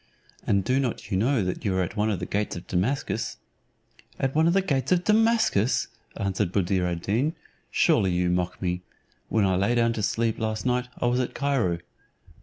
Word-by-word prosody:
and 100 -1 +2
do 130 +6 +1
not 130 -4 -3
you - - +1
know 115 +3 +2
that 90 0 -3
you 100 -3 0
are 95 - +2
at 90 - -5
one 105 0 +1
of 105 - 0
the 90 - -3
gates 105 +2 -2
of 85 - -7
Damascus?" 115 +5 -1 0.8
"At 135 0 -1
one 160 +2 +3
of 170 - +3
the 195 - +4
gates 135 -5 -1
of 180 -1 +3
Damascus!" 220 - +2 0.3
answered 95 -2 -1
Buddir 90 -1 +1
ad 85 -1 -3
Deen, 130 +11 0 0.3
"surely 95 - +3
you 90 0 +1
mock 90 0 -1
me. 90 -1 -2 0.5
When 110 -3 +2
I 95 -1 +2
lay 100 +6 +2
down 115 -1 +3
to 110 - -3
sleep 115 +2 0
last 110 0 -2
night 125 0 +1
I - - 0
was 120 +1 +2
at 125 - -2
Cairo." 130 -12 +1
110 Hz, 205 wpm, -26 LUFS, 95-130 Hz, 0.8 s, the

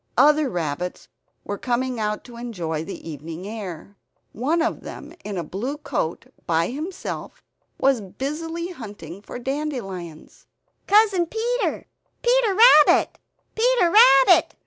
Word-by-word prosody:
Other 295 +2 +5
rabbits 175 -1 -4 0.3
were 205 -1 -5
coming 250 0 -1
out 210 0 -2
to 240 - -13
enjoy 175 -10 -4
the 180 -1 -8
evening 160 +4 -7
air. 200 -3 -8 0.3
One 310 +9 0
of 335 - -2
them 300 +3 -9
in 205 -2 -5
a 170 - -2
blue 230 - -4
coat, 275 - -3 0.2
by 165 0 +1
himself, 315 +8 -6 0.4
was 265 -4 +3
busily 325 - -5
hunting 205 - -9
for 210 - -8
dandelions. 240 - -6 0.4
"Cousin 405 -4 +4
Peter! 475 +5 -2 0.4
Peter 480 -5 +3 0.3
Rabbit, - - +2 0.3
Peter 460 -6 +3
Rabbit!" 270 - +6
250 Hz, 125 wpm, -23 LUFS, -, 0.4 s, Rabbit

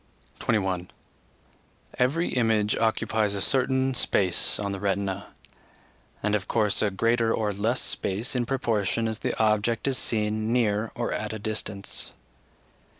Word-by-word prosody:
21. 95 -4 0 1.1
Every 140 +8 +2
image 110 -3 +2
occupies 110 -2 +1
a - - -2
certain 130 +4 +2
space 95 -7 +2
on 100 -1 -2
the 100 - -4
retina, 100 0 -1 1.0
and 105 0 +1
of 100 -3 0
course 105 -3 +1
a 105 - +3
greater 115 +3 +1
or 105 -2 0
less 110 +6 0
space 110 +8 -2
in 120 -2 0
proportion 115 -4 0
as 110 0 -3
the - - -2
object 110 +2 +2
is 130 -2 +1
seen 110 0 0
near 110 -2 +1
or 120 - -2
at 105 +1 -3
a - - -3
distance. 105 -2 -4
110 Hz, 140 wpm, -26 LUFS, 100-115 Hz, 1.1 s, a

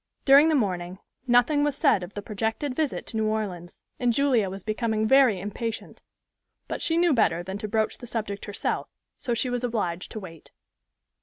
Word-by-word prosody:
During 280 +3 +7
the 315 - +3
morning 185 -7 -1 0.3
nothing 245 +5 +4
was 290 -2 0
said 190 - +3
of 180 +2 -9
the 205 - -5
projected 225 +6 -2
visit 305 -1 -1
to 225 - -5
New 220 0 +1
Orleans; 190 -5 -4 0.2
and 245 -1 +2
Julia 240 -5 +2
was 195 0 -7
becoming 220 0 -1
very 260 -6 +5
impatient, 215 +4 -5 0.7
but - - -4
she 330 0 +1
knew 345 -2 +4
better 175 -8 +2
than 190 +3 -5
to 215 - -4
broach 220 +1 -1
the 245 - -9
subject 210 -3 -4
herself; 205 - -3 0.3
so 240 -4 -1
she 250 +2 -1
was 245 0 -2
obliged 200 -7 -2
to 220 - -4
wait. 165 -5 -11
220 Hz, 185 wpm, -26 LUFS, 200-250 Hz, 0.7 s, During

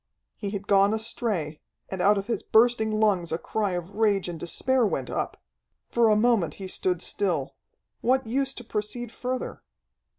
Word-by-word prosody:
He 205 - -4
had 200 -1 -5
gone 200 +1 +4
astray, 215 -9 -2 0.3
and 190 -1 -4
out 205 +2 +5
of 195 - -2
his 230 +1 -2
bursting 220 -1 +3
lungs 195 -6 +2
a 160 - 0
cry 205 +1 -2
of 175 +1 -4
rage 205 -3 +2
and 170 -2 -5
despair 260 - +1
went 140 - -1
up. - - -2 0.5
For 235 -1 +4
a 215 - +5
moment 220 -5 +2
he 195 - -7
stood 180 -2 0
still. 160 -9 -1 0.5
What 260 +1 +2
use 270 +4 0
to 245 - -8
proceed 220 +2 -4
further? 255 +2 -4
210 Hz, 170 wpm, -26 LUFS, 185-235 Hz, 0.5 s, out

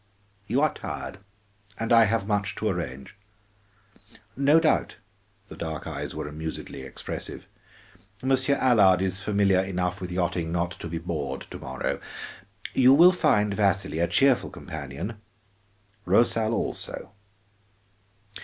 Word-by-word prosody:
"You 125 +6 +1
are 155 - +2
tired, 90 - -6 0.6
and 115 +1 0
I 115 -1 +7
have 110 -1 0
much 105 -1 -1
to - - -2
arrange. 65 +6 -4 1.2
No 140 +4 +5
doubt," 160 -1 +1 0.5
the - - -10
dark 80 -2 -5
eyes - - -5
were - - -4
amusedly 75 -2 -6
expressive, 65 -1 -7 0.8
"Monsieur 130 +1 +4
Allard 100 -9 +4
is 95 0 -2
familiar 100 -2 +2
enough 90 0 -2
with 90 -1 -5
yachting 85 -2 -1
not 85 +1 -1
to 90 - -7
be 85 0 -4
bored 75 -5 -4
to - - -7
morrow. 65 0 -3 0.7
You 130 +1 +6
will 175 +4 +8
find 105 - +2
Vasili 100 -5 0
a 85 - +2
cheerful 130 +9 +3
companion, 80 - -7 0.8
Rosal 110 +3 +3
also. 95 - -4
95 Hz, 125 wpm, -26 LUFS, 85-115 Hz, 1.2 s, will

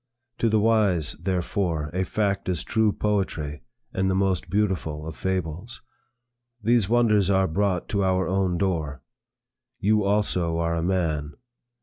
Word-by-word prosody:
To 115 - +2
the 110 0 +3
wise, 105 -8 +2
therefore, 90 -3 -1
a 95 +1 0
fact 100 0 -1
is 90 -3 -1
true 110 -2 +2
poetry, 90 -10 -2 0.3
and 95 0 +1
the 95 - +1
most 95 -2 0
beautiful 95 -7 -1
of 80 -1 -6
fables. 95 +3 -3 0.8
These 115 -2 +2
wonders 110 -5 +3
are 95 -1 +3
brought 95 +1 0
to 100 -1 +1
our 95 0 +1
own 95 -1 +1
door. 80 -7 -2 0.8
You 105 +1 +2
also 100 -5 +1
are 85 0 0
a 85 - -1
man. 80 -5 -1
95 Hz, 140 wpm, -25 LUFS, 85-105 Hz, 0.8 s, the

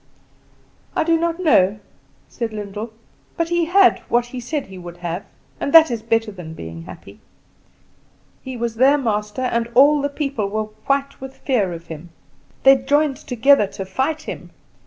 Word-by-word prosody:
"I - - +2
do 330 +1 +2
not 335 +1 -1
know," 210 - +3 0.5
said 230 -3 -5
Lyndall; 210 +2 -6 0.5
"but 335 -1 -1
he 345 -1 +1
had 370 +2 +4
what 240 0 +2
he 245 +1 -7
said 280 +4 -3
he 190 -1 -11
would 175 -1 -10
have, 175 +2 -4 0.4
and 280 - -2
that 320 -4 +8
is 230 -2 -3
better 225 -1 0
than 170 -5 -9
being 80 - -8
happy. - - -12 1.2
He 260 -1 -7
was 230 -1 -3
their 270 +4 +5
master, 210 -2 -2
and 235 -2 -1
all 285 +3 +6
the 285 - -1
people 275 -7 -2
were 215 +1 -1 0.2
white 275 0 -1
with 265 0 -9
fear 220 -9 0
of 165 0 -8
him. 160 +1 -9 0.5
They 270 0 +7
joined 285 +2 +1
together 245 -2 +3
to 195 - -7
fight 300 +10 -2
him. - - -7
245 Hz, 170 wpm, -20 LUFS, 205-285 Hz, 1.2 s, that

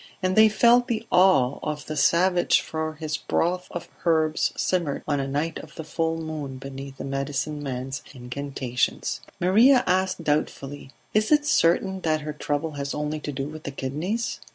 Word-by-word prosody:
And 185 0 +1
they 220 0 +7
felt 240 +3 +4
the 230 -2 -2
awe 180 -9 +4
of 150 -2 -4
the 155 - -5
savage 175 +5 +3
for 160 0 -4
his 155 0 -3
broth 180 +3 -1
of 175 -1 -6 0.2
herbs 160 -2 +2
simmered 170 -6 0
on 145 -2 +1
a 135 - -2
night 150 +4 -2
of - - -12
the 160 - -6
full 165 +1 -1
moon 155 -4 -5
beneath 135 0 -8
the - - -6
medicineman's 135 -1 -3
incantations. 130 -1 -2 0.2
Maria 235 +9 +5
asked 185 -1 +1
doubtfully: 145 -2 -2 0.2
"Is 215 +4 +2
it 295 -1 +5
certain 190 - +2
that 155 -2 +1
her 150 0 -5
trouble 150 +1 -2
has 140 -1 -4
only 150 +1 -2
to 150 - -5
do 135 0 -3
with 155 +1 -8
the 140 - -5
kidneys?" 155 - -3
155 Hz, 170 wpm, -25 LUFS, 140-180 Hz, 0.2 s, they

